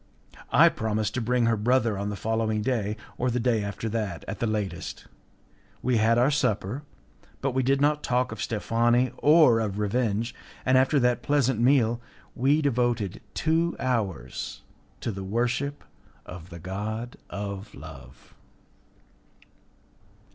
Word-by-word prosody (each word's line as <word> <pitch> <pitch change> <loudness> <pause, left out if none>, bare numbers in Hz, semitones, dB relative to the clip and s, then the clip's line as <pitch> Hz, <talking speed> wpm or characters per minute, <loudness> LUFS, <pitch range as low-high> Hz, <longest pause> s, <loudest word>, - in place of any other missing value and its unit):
I - - +7
promised 110 -1 -2
to 130 - -1
bring 120 +1 +1
her 115 0 +3
brother 115 0 +2
on 100 +1 -3
the 105 - -3
following 110 0 -1
day, 110 -4 -1 0.2
or 125 - +1
the 125 +1 0
day 115 -3 +1
after 100 +2 -4
that 105 -6 -3
at 105 - -5
the 115 - 0
latest. 105 -3 -3 0.8
We 125 -1 +2
had 115 +2 +3
our 125 +4 +4
supper, 125 -3 0 0.6
but 135 - -1
we 130 +1 +1
did 135 +2 +2
not 150 +1 +3
talk 125 -1 0
of 110 -2 -6
Steffani, 120 +3 +1
or 150 -6 +6
of 105 -3 -2
revenge, 110 +2 0 0.3
and 130 - +4
after 130 +3 +4
that 120 -1 +2
pleasant 130 -3 +1
meal 120 -2 +3 0.3
we 145 +5 +2
devoted 120 -7 0
two 165 +2 +1
hours 100 - -2 0.4
to 115 - -2
the 95 -1 -6
worship 125 +8 -1 0.4
of 90 -1 -10
the 85 - -9
god 105 +7 -5
of 100 +1 -6
love. 70 -3 -12
115 Hz, 145 wpm, -26 LUFS, 105-125 Hz, 0.8 s, I